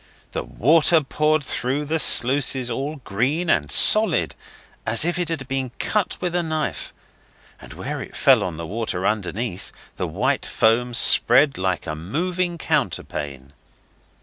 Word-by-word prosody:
The - - -3
water 160 +5 +3
poured 150 +2 0
through 135 +3 -3
the 160 +2 -1
sluices 130 -2 +3
all 140 +6 -4
green 140 - -1
and 75 -5 0
solid, - - +5 0.5
as 115 +6 0
if 175 +1 -1
it 175 -2 -2
had 150 -6 -4
been 135 -1 -3
cut 210 -4 -2
with 180 -1 -3
a 175 - +1
knife, 155 -2 -4 0.7
and - - -12
where - - -6
it - - -10
fell - - +4
on 85 -3 -5
the 85 - -6
water 95 -1 -4
underneath 105 -1 -3 0.3
the - - -3
white - - -1
foam 120 +2 +1
spread 135 +3 +4
like 95 -1 -2
a 75 - -4
moving 170 - -3
counterpane. 70 - -3
130 Hz, 150 wpm, -22 LUFS, 105-155 Hz, 0.7 s, solid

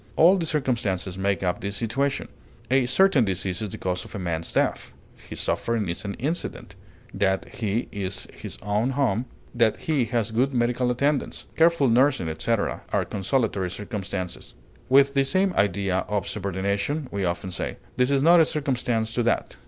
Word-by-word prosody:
All 175 +4 +6
the 170 -4 -1
circumstances 120 - -1
make 95 0 0
up 90 -1 -1
the 100 - -2
situation. 120 +7 -1 0.4
A 130 -2 +3
certain 155 -1 +4
disease 95 0 -1
is 105 - -3
the - - -6
cause 90 -1 -2
of - - -10
a - - -2
man's 85 -3 -3
death; - - 0 0.2
his - - -10
suffering 115 -4 0
is 85 - -3
an 100 -1 -4
incident; 160 +7 -4 0.4
that 95 -1 0
he 110 +1 -1
is 100 -2 -4
in - - -17
his - - -7
own 105 +4 +1
home, 120 -4 +1 0.3
that 115 -2 +2
he 145 -6 +1
has 115 -1 -1
good 130 +4 +1
medical 125 +1 +1
attendance, 140 +3 0
careful 165 -4 +4
nursing, 125 - +3
etc., 100 +8 -1
are - - +1
consolatory 100 -2 -1
circumstances. 95 -2 -5 0.3
With 140 +1 +5
the 135 -1 +3
same 185 +6 +1
idea 100 - +1
of 105 -3 -1
subordination, 100 - -2
we 100 -1 -2
often 85 +1 -2
say, - - -4 0.2
"This 125 0 +3
is 140 -1 +2
not 170 +2 +7
a 165 - +6
circumstance 125 -6 -1
to 120 - +1
that." 120 0 0
115 Hz, 175 wpm, -25 LUFS, 95-135 Hz, 0.4 s, not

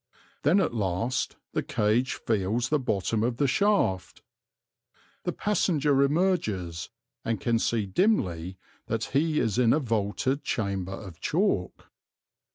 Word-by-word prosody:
Then 165 +8 +4
at 170 -10 +1
last 105 +4 -1 0.2
the - - +1
cage 110 +5 +1
feels 110 +3 -1
the 150 - +2
bottom 110 -3 -1
of 120 +1 0
the 145 - +2
shaft. 135 - +1 1.0
The - - +1
passenger 150 -9 +1
emerges, 140 - 0 0.3
and 115 -3 -1
can 115 +2 +1
see 115 -2 0
dimly 95 - 0 0.3
that 115 0 -1
he 155 +2 +2
is 110 +1 0
in 120 -2 +5
a 150 - +3
vaulted 115 +3 -1
chamber 100 -4 -2
of 95 -5 -9
chalk. 150 - -1
115 Hz, 130 wpm, -27 LUFS, 100-145 Hz, 1.0 s, in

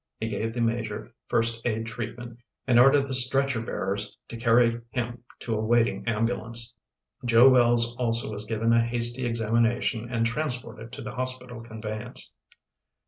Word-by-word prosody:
He 110 - -2
gave 115 +2 -3
the 120 - -1
Major 115 0 -2
first 115 0 0
aid 110 -1 -1
treatment 115 +1 -7 0.3
and 120 -2 +4
ordered 135 +1 +5
stretcher 130 -1 +1
bearers 100 -2 -3
to - - -7
carry 115 0 +3
him 120 +1 -4 0.2
to 115 - -2
a 110 0 -1
waiting 115 +1 +1
ambulance. 115 +1 -1 0.5
Joe 120 +1 +6
Wells 120 -2 +4
also 115 -2 -1
was 105 0 -5
given 115 +1 +1
a 115 - +5
hasty 120 +1 +1
examination 115 +1 +1
and 115 -2 +1
transported 120 -3 -3
to - - -7
the 110 - -6
hospital 125 -2 -4
conveyance. 110 -2 -3
115 Hz, 145 wpm, -26 LUFS, 115-120 Hz, 0.5 s, Joe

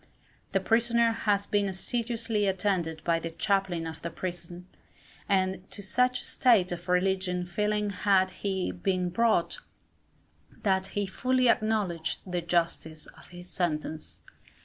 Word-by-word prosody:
The - - +2
prisoner 235 0 +3
has 205 -3 +1
been 205 -1 +1
assiduously 225 +1 -1
attended 180 -5 -1
by 170 -1 +2
the 165 - -4
chaplain 175 0 0
of 160 0 -7
the 170 - -3
prison, 175 +1 -6 0.6
and 190 -1 0
to 205 - -7
such 250 +5 +1
a - - -9
state 215 -8 +3
of 175 +1 -6
religious 180 -1 0
feeling 210 +1 0
had 190 -1 +2
he 190 -2 -2
been 185 0 -1
brought, 220 -3 +2 1.0
that 190 -1 +2
he 205 - +1
fully 255 +5 +1
acknowledged 210 -8 +1
the 180 -2 -2
justice 165 -2 -1
of - - -15
his 175 0 -11
sentence. 155 -3 -3
190 Hz, 135 wpm, -28 LUFS, 175-210 Hz, 1.0 s, prisoner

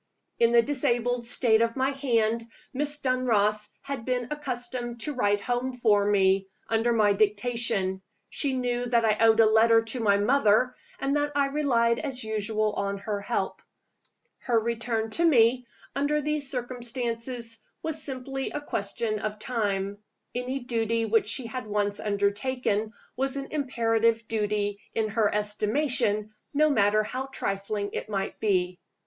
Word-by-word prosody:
In 235 0 +4
the 235 -1 +6
disabled 245 -3 0
state 230 -2 +3
of 230 0 +1
my 265 +1 +1
hand, 230 -4 0 0.3
Miss 290 +2 0
Dunross 215 -6 +1
had 275 -4 -5
been 250 0 -2
accustomed 245 -4 -4
to 300 - -1
write 205 -5 +1
home 245 +4 -1
for 210 -5 +2
me, 195 -1 +3 0.2
under 225 +1 +1
my 215 -3 +4
dictation: 205 -2 0 0.3
she 280 -3 -1
knew 245 -1 -1
that 235 -1 +2
I 215 -1 +2
owed 225 0 +5
a 225 - +8
letter 225 +1 +5
to 225 +3 -3
my 200 -3 +3
mother, 235 +2 +3 0.2
and 275 +1 -1
that 290 0 -1
I 280 -1 +2
relied 235 -5 +2
as 265 -5 -3
usual 215 0 -1
on 200 0 -2
her 205 0 -4
help. 200 - -2 0.8
Her 235 -3 +1
return 225 -1 -2
to 335 - +1
me, 250 -5 +4 0.3
under 285 +2 +1
these 300 -1 -1
circumstances, 240 -2 -3 0.2
was 315 -1 -2
simply 270 -1 -3
a - - -4
question 215 -4 -3
of 215 0 -3
time: 205 -3 -2 0.3
any 255 +2 -3
duty 230 -2 0
which 220 -1 +2
she 235 +3 0
had 230 0 -5
once 205 -1 -1
undertaken 210 +2 -1 0.2
was 270 +2 -1
an 275 0 -6
imperative 230 -5 +1
duty 210 -2 -1 0.2
in 220 -1 0
her 215 -1 +1
estimation, 210 0 +1 0.2
no 305 +1 +4
matter 215 -3 +3
how 260 +5 -4
trifling 200 -4 -3
it - - -4
might 195 -2 -3
be. 180 -4 0
230 Hz, 150 wpm, -27 LUFS, 210-255 Hz, 0.8 s, a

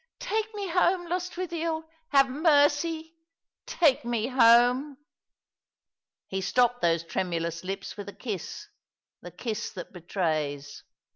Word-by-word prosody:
"Take 445 -3 -1
ma 405 -2 -3
home, 360 +1 +2
Lostwithiel 345 -2 -3 0.3
I 285 - +2
Have 275 -1 +7
mercy! 310 +3 +2 0.5
Take 305 -6 +3
me 235 -2 -1
home." 250 +3 +5 1.3
He 190 0 -3
stopped 245 +5 +2
those 165 -1 +2
tremulous 170 -1 -3
lips 195 +1 -5
with 205 0 -6
a - - -10
kiss 225 - -6 0.3
— - - -66
the - - -9
kiss 230 -2 -4
that 180 -2 -8
betrays. 155 -5 -3
250 Hz, 125 wpm, -27 LUFS, -, 1.3 s, Have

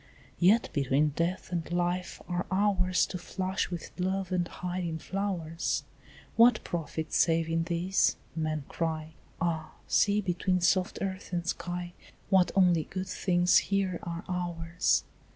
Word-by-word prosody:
"Yet 200 +6 +4
between 140 +1 +2
death 170 +6 -2
and 170 -1 -3
life 175 +1 -1
are 175 0 -2
hours 185 -2 +2
To 180 - -6
flush 190 +2 -2
with 175 -2 -6
love 190 0 -1
and 175 -2 +1
hide 180 0 -4
in 165 -2 -2
flowers; 175 -3 -2 0.5
What 230 0 +6
profit 160 -1 -4
save 165 -1 +3
in 165 0 0
these?" 175 +2 +2 0.2
men 155 -2 -1
cry: 160 -1 -3 0.3
"Ah, 160 -2 -1
see, 205 0 +3
between 180 -1 0
soft 180 +1 +2
earth 190 -1 -4
and 175 -1 -2
sky, 175 0 -3 0.4
What 190 -2 +5
only 180 -4 +4
good 185 0 -5
things 180 -1 +3
here 195 -3 0
are 170 0 -5
ours!" 175 -1 0
175 Hz, 140 wpm, -29 LUFS, 165-185 Hz, 0.5 s, What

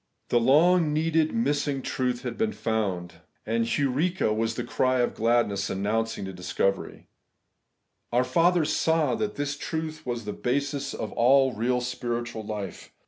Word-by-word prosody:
The 120 - +4
long 155 +6 +4
needed, 160 0 +2
long 230 0 0
missing 145 - 0
truth 125 -1 -2
had - - -4
been 220 0 0
found; 100 -6 -2 0.2
and 115 +1 0
evprjxa 140 - +1
was 115 +1 -1
the - - -3
cry 130 0 +1
of 120 - 0
glad 120 +1 +2
ness 100 0 -3
announcing 105 +2 -1
the 95 - -6
discovery. 95 +2 -2 1.1
Our 120 +1 +3
fathers 165 +5 +2
saw 160 -5 +2
that 215 -1 -2
this 145 0 -2
truth 160 +1 -4
was 120 -4 -4
the 105 - -3
basis 140 +2 -2
of 110 - -4
all 130 +2 +4
real 125 +3 0
spiritual 120 -2 -3
life. 105 -2 -6
125 Hz, 155 wpm, -26 LUFS, 115-150 Hz, 1.1 s, The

